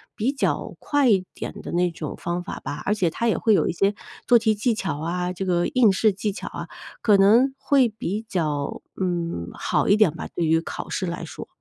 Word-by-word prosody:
比 240 +6 0
较 275 - -1
快 290 -3 +2
一 190 -3 +3
点 - - -7
的 - - -7
那 175 0 +1
种 160 -3 -6
方 175 +1 -3
法 190 - -6
吧， - - -5
而 205 - +2
且 180 -5 +1
它 235 +8 -2
也 225 - +2
会 220 - +3
有 - - +3
一 - - +1
些 195 +4 +1 0.3
做 240 -1 +6
题 220 -1 +2
技 225 +3 +1
巧 150 -8 -3
啊， 180 +2 -2
这 190 +2 -4
个 175 -1 +1
应 250 -7 +4
试 215 +3 +3
技 205 +2 -2
巧 - - -7
啊， - - -6 0.3
可 205 -3 +5
能 235 +7 +5
会 270 -4 +3
比 215 0 -4
较， 150 -7 -2 0.2
嗯， 170 - -2
好 - - 0
一 200 - +6
点 215 -7 +5
吧， - - -6
对 170 - -1
于 160 +1 +3
考 - - -6
试 185 - -2
来 170 0 -4
说。 - - -8
195 Hz, 245 characters per minute, -24 LUFS, 175-220 Hz, 0.3 s, 做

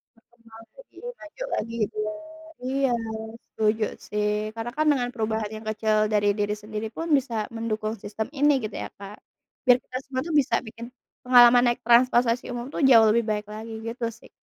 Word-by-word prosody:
Terkenal 235 +1 -30 0.5
lebih - - -17 0.2
maju 315 +11 -8
lagi, 230 +2 -3
gitu. 215 +1 -8 0.7
Iya, 270 +1 +1 0.6
setuju 215 0 +1 0.2
sih. 210 0 0 0.3
Karena 230 +1 -4
kan 310 0 +1
dengan 250 -4 -1
perubahan 220 -2 -2
yang 215 0 -10
kecil 215 0 0 0.2
dari 205 -1 +2
diri 205 0 0
sendiri 215 +1 -5
pun 330 +1 -4
bisa 255 -3 -5 0.2
mendukung 220 -1 -2
sistem 215 +1 -4
ini 295 +1 +5
gitu 215 - -5
ya, - - -5
Kak. 200 +1 -9 0.5
Biar 250 -1 +6
kita 255 - -7
semua 260 -1 -3
tuh 330 - -3
bisa 275 - -2
bikin 230 +1 -9 0.4
pengalaman 245 -1 +7
naik 240 0 +1
transportasi 240 0 +4
umum 240 0 -5
tuh - - -4
jauh 230 -4 +7
lebih 235 +1 +2
baik 210 -1 -2
lagi, 220 +2 -8 0.2
gitu 235 +1 -4
sih. - - -17
230 Hz, 175 wpm, -25 LUFS, 215-250 Hz, 0.7 s, pengalaman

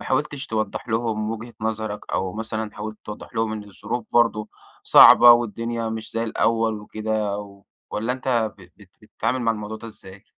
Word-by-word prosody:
ما - - -8
حاولتش 140 -1 -1
توضح 110 +1 -3
لهم 110 -1 -1
وجهة 115 +1 -7
نظرك؟ 110 -1 -4
أو 95 -1 -1
مثلًا 110 -1 -4
حاولت 110 +1 -6
توضح 105 +3 -9
لهم 110 -1 0
إن 105 -1 -5
الظروف 105 +4 -5
برضه 115 -3 +2 0.3
صعبة 120 0 +9
والدنيا 115 0 -1
مش 110 0 -6
زي 115 - -1
الأول 115 -1 0
وكده؟ 105 -1 -2 0.5
والّا 115 +4 -1
أنت 120 -4 -1
ب 95 - -14
بت 100 -3 -18
بتتعامل 115 +4 -2
مع 115 -1 +2
الموضوع 105 0 -6
ده 115 - -10
إزاي؟ 95 -3 -13
110 Hz, 170 wpm, -23 LUFS, 105-115 Hz, 0.5 s, صعبة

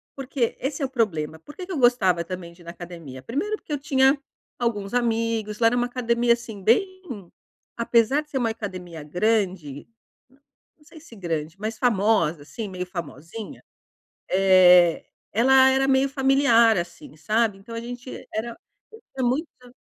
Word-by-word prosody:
Porque 265 -3 -2
esse 280 +2 -3
é - - +1
o - - -5
problema, 160 - -1
por 295 - -14
que 365 - -7
que 380 - -9
eu 330 - -2
gostava 190 -9 +3
também 175 -1 -7
de 170 - -19
ir 170 - -17
na 170 - -7
academia? 170 -7 -10
Primeiro, 395 - -2
porque 315 - -14
eu 290 - -1
tinha 270 0 +3 0.4
alguns 210 -3 -2
amigos 230 -3 -1
lá 230 - +5
era 245 +2 +2
uma 245 - +1
academia, 240 -1 +1
assim, 225 -4 -7
bem 375 - +2 0.8
apesar 235 +4 +2
de 300 - -18
ser 270 - -3
uma 235 -3 +1
academia 185 -7 -7
grande, 180 -4 -1 0.9
não 300 - -25
sei 320 - -14
se 270 -7 -15
grande, 165 -4 -4
mas 215 +1 -4
famosa, 200 - +2
assim, 220 +7 -6
meio 180 -1 -5
famosinha, 175 - -8 0.7
eh, 180 -2 +6 0.3
ela 265 +4 +5
era 270 0 +2
meio 270 +1 +3
familiar, 270 -5 +4
assim, 175 -3 -7
sabe. 215 +2 0
Então 230 +4 -11
a 230 - -4
gente 245 +2 -8 0.2
era 230 +2 -4 0.6
era 260 - -1
muita 250 -2 -4
230 Hz, 165 wpm, -24 LUFS, 180-260 Hz, 0.9 s, eh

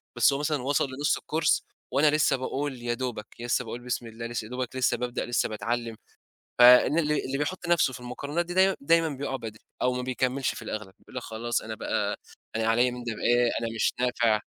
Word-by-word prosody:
بس 120 +3 +5
هو 140 - -1
مثلًا 150 -2 0
وصل 145 +2 +2
لنُص 140 +3 0
الcourse، 155 -1 +1 0.3
وأنا 145 +3 +4
لسه، 145 -3 +3
باقول 135 0 -3
يا 120 0 -1
دوبك، 120 -3 -4
لسه 120 +1 0
باقول 115 +2 -6
بسم 120 -1 -3
الله، 115 +1 -7
لسه 115 -2 -4
يا 110 - -11
دوبك 125 0 -4
لسه 130 -1 +2
بابدأ، 125 0 -3
لسه 120 - 0
باتعلم. 115 +2 -3 0.6
فإن 125 +6 +8
اللي 150 -2 0
اللي 135 +1 -2
بيحط 175 +5 -3
نفسه 170 -6 +3
في 125 - -7
المقارنات 140 +7 -3
دي، 175 - -5
دايمًا 190 +1 +4
دايمًا 165 +3 +3
بيقع 140 -1 -3
بدري، 110 -4 -7 0.2
أو 125 - +2
ما 125 - -2
بيكملش 130 +1 -1
في - - -8
الأغلب، 105 -3 -6
بيقول - - -17
لك 125 - -3
خلاص، 115 +2 -2
أنا 110 0 -6
بقى، - - -1 0.4
أنا 115 0 0
عليّا 120 +2 +3
من 125 0 -7
ده 120 -1 -3
بإيه، 120 +1 +3
أنا 115 - -2
مش 115 - +1
نافع. 120 -3 +2
125 Hz, 215 wpm, -27 LUFS, 120-140 Hz, 0.6 s, فإن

